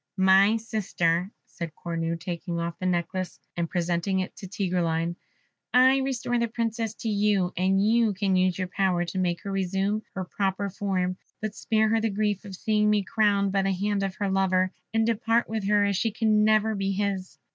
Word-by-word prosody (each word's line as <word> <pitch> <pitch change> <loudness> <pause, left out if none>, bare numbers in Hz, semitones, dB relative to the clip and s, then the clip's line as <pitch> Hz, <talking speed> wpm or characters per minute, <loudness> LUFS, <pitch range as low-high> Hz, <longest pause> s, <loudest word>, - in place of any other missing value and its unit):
"My 190 +3 +5
Sister," 185 -6 -1 0.2
said 170 -3 -7
Cornue, 165 -1 -3
taking 170 0 -4
off 170 0 -4
the 185 - -1
necklace 180 +1 -2 0.2
and 170 -1 -2
presenting 175 +2 0
it 185 - -6
to 190 - -8
Tigreline, 175 -4 -1 0.6
"I 260 +2 +6
restore 250 -3 -1
the 235 - +1
Princess 225 -1 -2
to - - -3
you, 205 -3 +1
and 190 +2 +2
you 225 -2 +3
can 195 -1 +1
use 185 -1 +2
your 185 -1 -2
power 185 -2 +1
to 180 +2 -4
make 175 -2 -1
her 200 - -4
resume 195 +2 0
her 190 -1 -3
proper 195 +1 -2
form, 185 -2 -1 0.2
but 215 -1 -4
spare 220 0 +1
her 225 0 +2
the 225 - +1
grief 205 0 -1
of 195 -2 -7
seeing 210 +2 +1
me 210 -1 +2
crowned 200 -1 +2
by 195 0 +2
the 195 0 +1
hand 200 +2 -1
of 195 -1 -2
her 200 - -2
lover, 185 -1 +2 0.2
and 225 0 +2
depart 230 +1 +1
with 220 -3 -3
her, 205 0 +4
as 200 -2 0
she 225 - +1
can 215 -1 +2
never 215 0 +3
be 195 -1 -1
his." 195 -2 -2
195 Hz, 195 wpm, -26 LUFS, 185-215 Hz, 0.6 s, I